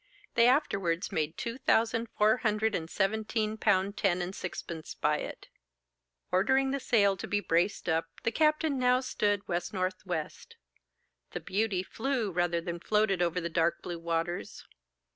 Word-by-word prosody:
They 235 0 +5
afterwards 195 - +1
made 155 0 -1
two 235 +2 -4
thousand 230 -1 +2
four 215 +3 +4
hundred 215 -1 +1
and 165 -3 -3
seventeen 215 +2 0
pound 200 -1 +1
ten 185 -3 +2
and 180 +1 -3
sixpence 170 -3 -6
by 150 0 +1
it. - - -7 0.8
Ordering 265 +8 +3
the 275 - -1
sail 200 -6 +3
to - - -6
be 205 - +1
braced 175 +1 0
up, 165 0 +1 0.2
the 230 - +1
captain 305 -1 +2
now 250 0 +3
stood 205 -6 0
W.N.W. 185 +2 -1 1.4
'The - - -3
Beauty' 200 -2 -1
flew 235 0 -2
rather 175 -1 +1
than 170 0 -5
floated 210 -1 +1
over 175 0 +1
the 170 - -3
dark 170 0 0
blue 175 -1 -5
waters. 165 +1 -3
200 Hz, 150 wpm, -30 LUFS, 175-225 Hz, 1.4 s, They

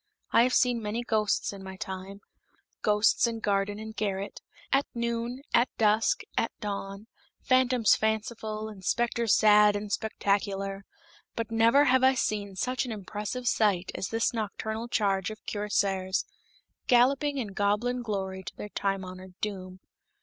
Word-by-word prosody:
I - - +6
have 250 +1 +3
seen 245 -2 +3
many 220 +3 -3
ghosts 215 -3 0
in 195 -1 -9
my 190 0 -8
time 190 +1 -7 0.6
ghosts 210 +3 +3
in 230 -1 -3
garden 205 -1 0
and 220 0 -8
garret, 200 -1 -3 0.3
at 275 +1 +3
noon, 235 +2 -2
at 240 - +4
dusk, 215 0 +3
at - - +1
dawn, 200 -1 -5 0.4
phantoms 255 -4 +4
fanciful, 220 0 -2
and 205 -3 -10
specters 235 +1 +2
sad 210 -1 +6
and 205 0 -4
spectacular 195 -2 -1 0.5
but 230 -1 -3
never 230 +5 +5
have 260 0 +4
I 265 0 +5
seen 205 -5 -2
such 255 +6 -1
an 250 - -5
impressive 210 +4 -5
sight 200 -5 +2
as - - -3
this 225 +2 0
nocturnal 220 +1 -3
charge 195 -5 0
of 215 0 -10
cuirassiers, 195 -2 0 0.6
galloping 275 +4 +3
in 235 -6 -2
goblin 210 +5 0
glory 190 -4 -3
to 180 - -9
their 210 - -7
time 195 -1 -2
honored 185 0 -10
doom. 185 -3 -5
210 Hz, 150 wpm, -28 LUFS, 195-235 Hz, 0.6 s, I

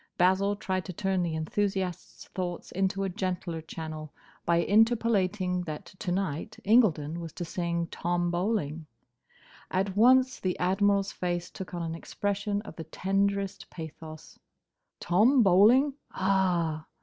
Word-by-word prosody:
Basil 190 +3 +3
tried 185 -2 -2
to 185 - -6
turn 190 +1 0
the 170 -2 -1
enthusiast's 190 +2 -2
thoughts 180 -2 -5
into 195 +1 0
a 195 - -1
gentler 180 -3 -3
channel 155 -1 -7 0.4
by 170 - +4
interpolating 205 -4 +2
that 155 -3 -6
to 180 - -3
night 185 +2 -2
Incledon 170 -8 +3
was 165 -2 -6
to 175 - -5
sing 170 -1 -2
"Tom 175 +1 -1
Bowling." 170 -5 -1 0.8
At 190 +1 -1
once 255 +4 +5
the 185 -1 -1
Admiral's 195 +2 +2
face 175 -1 -3
took 185 -1 -7
on 170 - -3
an 165 -1 -3
expression 200 +4 -2
of 205 - -11
the 160 - -6
tenderest 195 0 -1
pathos. 160 -1 -10 0.6
"Tom 225 +9 +4
Bowling?—Ah!" 190 - +3
185 Hz, 130 wpm, -28 LUFS, 170-200 Hz, 0.8 s, once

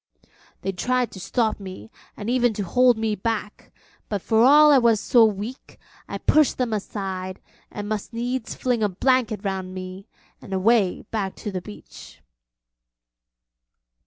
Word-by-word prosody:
They 195 - -1
tried 250 +5 -1
to 190 - -10
stop 220 +3 -1
me, 195 +3 -9 0.3
and 205 - -6
even 245 -1 +2
to 205 - -3
hold 245 +5 +3
me 220 -1 -1
back, 210 0 -4 0.4
but 205 - -1
for 220 +4 +2
all 300 +3 +7
I 280 - +7
was 230 -3 +3
so 235 +2 +4
weak, 215 +4 -4 0.3
I - - -4
pushed 305 -2 +3
them 245 -3 -1
aside 190 -3 -4 0.3
and 205 -1 -6
must 215 -1 -4
needs 245 +1 -3
fling 245 -3 -1
a 210 - +2
blanket 230 +1 +1
round 190 -1 -3
me 185 +2 -8 0.3
and 195 - -8
away 195 0 +2
back 200 -4 -2
to 210 - -6
the 185 -1 -4
beach. 105 -11 -13
215 Hz, 155 wpm, -23 LUFS, 195-245 Hz, 0.4 s, all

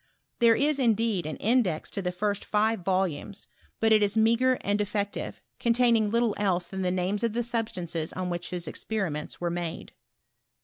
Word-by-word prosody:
There 230 -1 +6
is, 290 +2 +1
indeed, 225 - +1
an 155 - -4
index 215 -8 +1
to 200 - -3
the 180 -1 -1
first 200 +2 -2
five 220 +1 +1
volumes; 190 +1 -1 0.3
but 225 0 +3
it 215 -1 +6
is 205 +1 +1
meagre 235 +4 +4
and 205 +1 0
defective, 205 0 -3 0.2
containing; 235 -2 +3
little 230 0 +2
else 185 -3 +1
than 190 +1 -5
the 180 - +1
names 185 +4 -1
of 230 -2 +1
the 240 +1 0
substances 180 -9 -2
on 185 -1 -3
which 175 0 -4
his 180 -1 -4
experiroenls 175 -7 -3
were 175 -1 -1
made. 170 -1 -5
205 Hz, 175 wpm, -27 LUFS, 180-225 Hz, 0.3 s, There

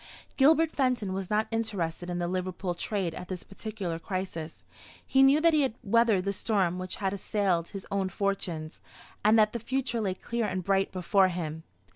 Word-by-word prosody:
Gilbert 315 +3 +5
Fenton 250 -8 0
was 190 -1 -4
not 215 +1 +1
interested 185 -7 -2
in 175 - -2
the 175 0 -1
Liverpool 185 0 -2
trade 180 -1 -2
at 180 - -7
this 185 -2 -5
particular 195 -5 -5
crisis. 175 -4 -5 0.4
He 265 - +3
knew 270 +2 +6
that 330 +1 +4
he 305 - +4
had 265 -5 0
weathered 225 -2 +3
the 200 +1 -1
storm 190 -4 0
which 185 0 -5
had 195 -1 -1
assailed 195 -4 0
his 195 -1 -7
own 195 -1 0
fortunes, 180 -5 -3 0.4
and 215 +2 +5
that 215 -1 +4
the 235 - -2
future 245 0 -1
lay 190 -3 -1
clear 235 +2 -2
and 185 -2 -3
bright 195 +1 +1
before 190 +1 +3
him. 160 -3 -4
195 Hz, 185 wpm, -29 LUFS, 180-225 Hz, 0.4 s, knew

